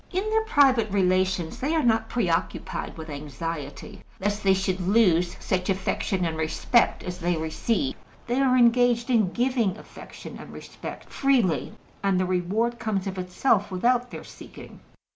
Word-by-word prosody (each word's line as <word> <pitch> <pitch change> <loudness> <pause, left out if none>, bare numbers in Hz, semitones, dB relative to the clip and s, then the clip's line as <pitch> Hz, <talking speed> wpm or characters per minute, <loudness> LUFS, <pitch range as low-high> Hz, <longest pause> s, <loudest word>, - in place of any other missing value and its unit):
In 380 +3 -1
their 445 0 +2
private 265 - +4
relations 185 -3 +1
they 300 +5 0
are 315 - +2
not 225 -2 +2
pre 235 -6 0
occupied 170 0 -2
with 160 0 -8
anxiety 150 +5 -6 0.2
lest 205 +2 -1
they 195 -1 +4
should 190 -1 -1
lose 180 -3 +3
such 185 0 -2
affection 190 0 -1
and 165 -1 -2
respect 160 +9 +1
as 180 0 -6
they 175 -1 0
receive: 215 - -1 0.3
they 245 +2 0
are 255 -2 +3
engaged 240 0 +3
in 215 -7 +3
giving 240 -6 0
affection - - -11
and - - -10
respect - - -9
freely, 255 - +1 0.3
and 195 -2 +2
the 185 - +1
reward 200 +7 -1
comes 215 -5 -2
of 190 -1 -4
itself 195 +3 +1
without 245 +6 +1
their - - -8
seeking. - - -12
195 Hz, 160 wpm, -25 LUFS, 180-240 Hz, 0.3 s, private